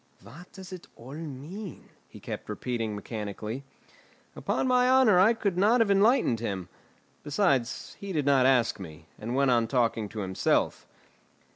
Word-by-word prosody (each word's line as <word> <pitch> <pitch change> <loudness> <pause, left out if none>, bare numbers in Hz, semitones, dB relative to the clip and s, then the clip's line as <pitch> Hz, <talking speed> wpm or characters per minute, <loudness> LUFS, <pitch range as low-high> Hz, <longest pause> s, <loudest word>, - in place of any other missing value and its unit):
"What 165 +9 -13
does 190 -1 -10
it 180 - -10
all 125 +4 -11
mean?" 160 +5 -8 0.2
he - - -13
kept - - -7
repeating 115 -4 -3
mechanically. 105 +4 -6 0.7
Upon - - -1
my 250 0 +3
honour 255 -8 +5
I 220 +5 +5
could 200 -5 -1
not 220 +5 +4
have 225 -3 +3
enlightened 200 - +3
him. 95 -5 -4 0.5
Besides 140 - 0
he 200 -1 -6
did 150 -6 -1
not 135 -2 +4
ask 125 -5 +2
me, 80 -4 -10
and 110 - -6
he 125 - -1
went 140 -2 +3
on 115 -2 +2
talking 115 -4 0
to 105 0 -5
himself. 95 -1 0
135 Hz, 160 wpm, -28 LUFS, -, 0.7 s, honour